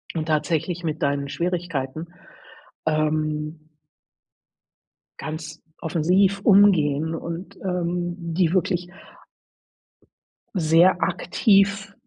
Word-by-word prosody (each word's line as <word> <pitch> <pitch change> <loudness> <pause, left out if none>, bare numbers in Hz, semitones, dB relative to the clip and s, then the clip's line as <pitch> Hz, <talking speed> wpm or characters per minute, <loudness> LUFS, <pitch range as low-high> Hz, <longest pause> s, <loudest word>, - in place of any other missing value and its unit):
und 160 -1 -2
tatsächlich 160 +3 -1
mit 155 -1 -3
deinen 140 0 0
Schwierigkeiten, 170 -3 -3 0.8
ähm 155 0 -1 1.6
ganz 155 0 -7 0.2
offensiv 180 +5 +2
umgehen 160 -7 +4
und, 170 +3 -6
ähm, 175 -1 -2
die 170 -1 0
wirklich 180 -1 0 1.7
sehr 170 +1 +4
aktiv, 195 +2 +2
170 Hz, 75 wpm, -23 LUFS, 155-180 Hz, 1.7 s, umgehen